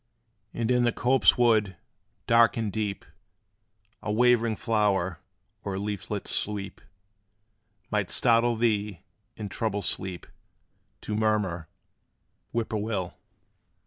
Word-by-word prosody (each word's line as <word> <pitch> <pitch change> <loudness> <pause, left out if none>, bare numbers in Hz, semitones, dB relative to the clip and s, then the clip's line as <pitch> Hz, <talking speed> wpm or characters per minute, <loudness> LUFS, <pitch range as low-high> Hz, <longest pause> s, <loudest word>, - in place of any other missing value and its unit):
And 115 +1 -1
in 125 -1 +3
the 120 - +3
copse 130 +3 +3
wood, 110 -6 +3 0.5
dark 115 -2 +4
and 110 -4 -2
deep, 105 -2 -3 1.0
A 105 - -3
waving 115 0 +3
flower, 100 -6 0 0.4
or 100 -1 -3
leaflet's 100 0 -4
sweep 100 -2 -3 1.1
Might 105 -4 0
startle 120 0 +3
thee, 105 -5 0 0.4
in 105 - -5
troubled 105 -1 -2
sleep 90 +1 0 0.8
To 105 - -5
murmur, 105 -6 0 0.8
"Whip 115 -1 -2
poor 110 -2 -2
will!" 105 -4 -3
105 Hz, 110 wpm, -27 LUFS, 100-115 Hz, 1.1 s, dark